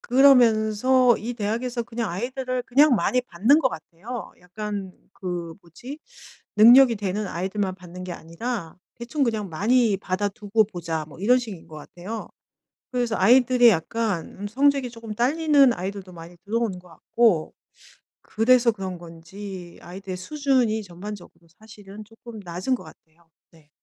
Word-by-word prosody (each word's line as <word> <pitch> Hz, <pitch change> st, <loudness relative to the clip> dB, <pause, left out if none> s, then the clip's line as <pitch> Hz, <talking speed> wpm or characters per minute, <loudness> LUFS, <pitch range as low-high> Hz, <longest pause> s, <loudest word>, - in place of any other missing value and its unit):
그러면서 245 Hz, -1 st, +4 dB
이 235 Hz, +3 st, -5 dB
대학에서 235 Hz, +3 st, -2 dB
그냥 230 Hz, -3 st, -4 dB
아이들을 255 Hz, +5 st, -3 dB
그냥 275 Hz, +2 st, +4 dB
많이 250 Hz, +3 st, +1 dB
받는 245 Hz, -, +3 dB
것 260 Hz, -, +2 dB
같아요. 200 Hz, +9 st, -8 dB
약간 200 Hz, +1 st, -6 dB, 0.2 s
그 175 Hz, -3 st, -5 dB
뭐지? 240 Hz, -, -10 dB, 0.6 s
능력이 240 Hz, +2 st, +8 dB
되는 205 Hz, +1 st, -2 dB
아이들만 190 Hz, +2 st, -3 dB
받는 180 Hz, 0 st, -11 dB
게 180 Hz, -, -6 dB
아니라 170 Hz, +3 st, -6 dB, 0.2 s
대충 260 Hz, +5 st, -2 dB
그냥 220 Hz, -4 st, -1 dB
많이 220 Hz, +5 st, +2 dB
받아두고 205 Hz, +3 st, -1 dB
보자 165 Hz, -5 st, -5 dB
뭐 155 Hz, -, -14 dB
이런 245 Hz, +6 st, +4 dB
식인 215 Hz, -9 st, -9 dB
것 155 Hz, -, -12 dB
같아요. 185 Hz, +8 st, -8 dB, 0.6 s
그래서 245 Hz, -3 st, -1 dB
아이들이 245 Hz, +3 st, +5 dB
약간 205 Hz, 0 st, -1 dB
음 205 Hz, -, -5 dB
성적이 275 Hz, +2 st, +2 dB
쪼끔 230 Hz, -2 st, -8 dB
딸리는 280 Hz, +2 st, +3 dB
아이들도 190 Hz, +1 st, -6 dB
많이 170 Hz, +1 st, -12 dB
들어오는 220 Hz, -3 st, -2 dB
것 180 Hz, 0 st, -17 dB
같고 170 Hz, +1 st, +1 dB, 0.7 s
그래서 235 Hz, +2 st, +3 dB
그런 190 Hz, -3 st, -6 dB
건지 175 Hz, +2 st, -10 dB
아이들의 185 Hz, +1 st, -8 dB
수준이 250 Hz, -1 st, 0 dB
전반적으로 180 Hz, -2 st, -10 dB
사실은 210 Hz, -1 st, -12 dB
쪼끔 225 Hz, +1 st, -12 dB
낮은 180 Hz, +9 st, -2 dB
것 -, -, -10 dB
같아요. 165 Hz, +1 st, -19 dB, 0.2 s
네. 155 Hz, -3 st, -23 dB
215 Hz, 320 characters per minute, -24 LUFS, 180-245 Hz, 0.7 s, 능력이